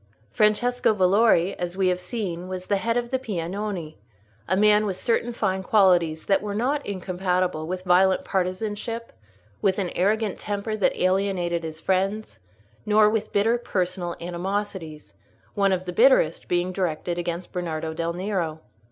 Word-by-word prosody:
Francesco 220 - +2
Valori, 195 -1 +4
as 175 +1 -4
we 190 -1 +3
have 180 0 0
seen, 180 -4 -4
was 185 0 -5
the 200 - +1
head 230 +4 0
of 240 0 -2
the 260 - +1
Piagnoni, 190 - -4 0.5
a 185 - +1
man 210 +1 +4
with 190 -2 -3
certain 235 +3 0
fine 190 -5 -1
qualities 180 -6 +3
that 195 - +2
were 205 -1 -4
not 275 +6 0
incompatible 180 -3 -1
with 185 +1 -4
violent 185 +1 +3
partisanship, 205 +5 -3 0.5
with 190 -2 +2
an 190 -4 -2
arrogant 210 +2 0
temper 205 +1 -3
that 205 - 0
alienated 185 -2 0
his 160 0 -6
friends, 195 +5 -1 0.4
nor 210 0 +4
with 215 -1 -2
bitter 225 +4 +2
personal 180 -5 -2
animosities—one 175 - -4
of 185 -1 -1
the 180 - -4
bitterest 225 - +4
being 175 +1 0
directed 175 -1 -2
against 175 +1 -4
Bernardo 160 -3 -3
del 165 +1 -2
Nero. 175 -4 -2
190 Hz, 150 wpm, -24 LUFS, 175-210 Hz, 0.5 s, Valori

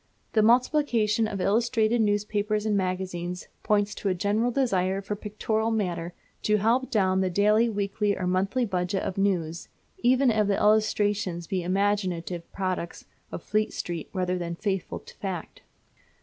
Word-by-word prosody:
The 220 - +4
multiplication 230 -2 +3
of 200 -2 -4
illustrated 225 +3 +2
newspapers 210 0 0
and 215 -1 +1
magazines 180 -2 -3
points 205 0 +1
to 200 - -2
a 185 - +1
general 210 +6 +1
desire 195 -7 +1
for 200 +1 -4
pictorial 215 +2 -2
matter 175 -6 -2 0.3
to 210 0 +2
help 235 +5 +1
down 190 -4 +2
the 190 - +1
daily, 210 +5 +3
weekly, 205 0 -1
or 185 - -2
monthly 195 +7 +1
budget 185 -1 -1
of 190 - -3
news, 170 -4 -1 0.3
even 255 +1 +4
if 215 -2 +2
the 200 - +1
illustrations 210 -4 +1
be 190 -1 -2
imaginative 185 -2 -1
products 185 -3 -3 0.3
of - - -6
Fleet 215 +1 0
Street 170 -3 -4
rather 180 -1 -1
than 170 -1 -4
faithful 195 -1 -2
to - - -15
fact. 185 -5 -5
205 Hz, 150 wpm, -26 LUFS, 185-215 Hz, 0.3 s, The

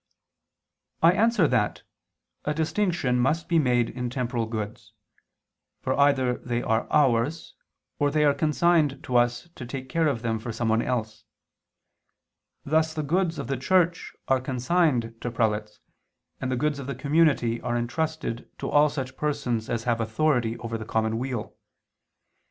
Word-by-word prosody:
I 165 - +8
answer 215 -2 +3
that, 105 -5 0 0.6
A 150 - -1
distinction 160 -6 0
must 155 +7 +1
be 170 -1 +3
made 125 -4 +2
in 125 -1 -4
temporal 125 -2 -2
goods: 110 -1 -6 0.9
for - - 0
either 135 -3 +2
they 120 -1 -2
are 110 0 0
ours, 140 +2 +2 0.5
or 145 -1 +3
they 150 +1 +2
are 145 - +5
consigned 155 -2 +2
to 125 - -4
us 120 +5 +2
to 130 - -9
take 130 +1 -6
care 165 +4 +2
of 120 -6 -1
them 115 -1 -1
for 115 +2 -5
someone 115 0 +1
else; 110 -3 -3 1.4
thus 160 +2 +1
the 155 - -2
goods 170 +3 0
of - - -4
the 135 +2 -2
Church 175 +5 +1
are 130 -1 +2
consigned 130 -2 +1
to 120 - -2
prelates, 105 -2 -1 0.6
and 130 - -2
the - - +1
goods 150 +2 0
of 135 - -7
the 140 - -3
community 140 -4 +2
are 120 0 -1
entrusted 125 0 -3
to - - -4
all 150 +1 +5
such 135 -2 -5
persons 125 -7 -2
as 115 -1 -1
have 115 -1 0
authority 115 0 +1
over 115 -1 -5
the - - -5
common 110 +1 -1
weal. 125 -4 -4
130 Hz, 155 wpm, -26 LUFS, 115-150 Hz, 1.4 s, I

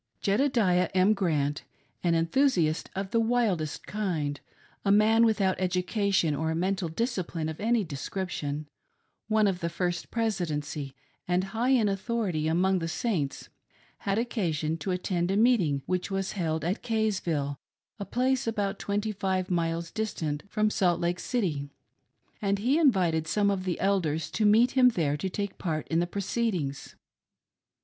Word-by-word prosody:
Jedediah 200 -5 +2
M. 190 +3 +5
Grant, 150 -7 0 0.4
an 170 -2 +3
enthusiast 165 - +2
of 195 0 -3
the 230 - +3
wildest 225 - 0
kind; 165 -9 -2 0.4
a 200 - +2
man 220 +3 +5
without 205 -5 +2
education 185 -2 +1
or 160 +2 -1
mental 185 0 -1
discipline 180 -5 -2
of 160 -1 -5
any 225 +1 +2
description; 150 -2 -4 0.6
one 215 -1 +3
of 190 -3 +1
the 170 -2 -2
First 175 +1 -2
Presidency 155 - -2 0.3
and 180 +1 +2
high 235 +3 +1
in 245 -5 +4
authority 195 -5 -1
among 185 +3 +2
the 165 - -3
Saints, 165 - -2 0.5
had 195 0 -1
occasion 170 -10 -1
to 190 - -4
attend 180 -1 -1
a 195 - +1
meeting 195 - +3
which 185 +1 -1
was 195 -1 -2
held 160 -5 -2
at 185 +5 -1
Kaysville, 185 - -1 0.4
a 200 - -4
place 255 +1 0
about 205 -3 -1
twenty 205 +2 -1
five 190 -2 -1
miles 165 -1 -1
distant 160 -9 -2
from 215 +1 +1
Salt 175 -4 +2
Lake 175 +1 -1
City, 160 - -1 0.7
and 200 -1 +1
he 255 +10 +2
invited 180 - +3
some 200 +4 +2
of 190 -2 -2
the 180 -2 -2
Elders 165 -6 0
to 215 -1 +2
meet 230 +4 +5
him 255 -1 +6
there 160 -10 0
to 170 +6 -3
take 200 +2 -4
part 155 -4 -2
jn 165 - +2
the 175 - +1
proceedings. 185 -7 -2
185 Hz, 150 wpm, -28 LUFS, 165-215 Hz, 0.7 s, him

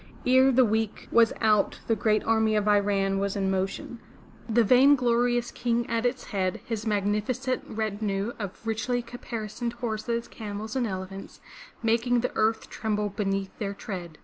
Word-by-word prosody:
Ere 260 +1 +5
the 255 0 +5
week 220 -1 -1
was 230 -1 +5
out 215 -2 +2
the 225 - +2
great 215 0 +1
army 220 -1 +2
of 210 0 +1
Iran 200 -1 +2
was 200 0 -1
in 195 -1 0
motion, 195 +5 -3 0.5
the 230 +1 +4
vainglorious 245 -1 +4
King 240 -1 -1
at 230 +1 +1
its 245 0 -3
head, 185 -3 -2
his 225 -1 -4
magnificent 215 +5 0
retinue 210 0 -2
of 200 +1 -7
richly 240 +2 -1
caparisoned 235 -1 -5
horses, 235 0 -3
camels 215 +1 -6
and 250 -3 +1
elephants, 190 0 -7 0.4
making 235 +2 +2
the 250 - -1
earth 220 +1 +1
tremble 210 -1 -2
beneath 195 -1 -2
their 200 -2 -3
tread. 180 -6 -7
220 Hz, 150 wpm, -27 LUFS, 200-240 Hz, 0.5 s, Ere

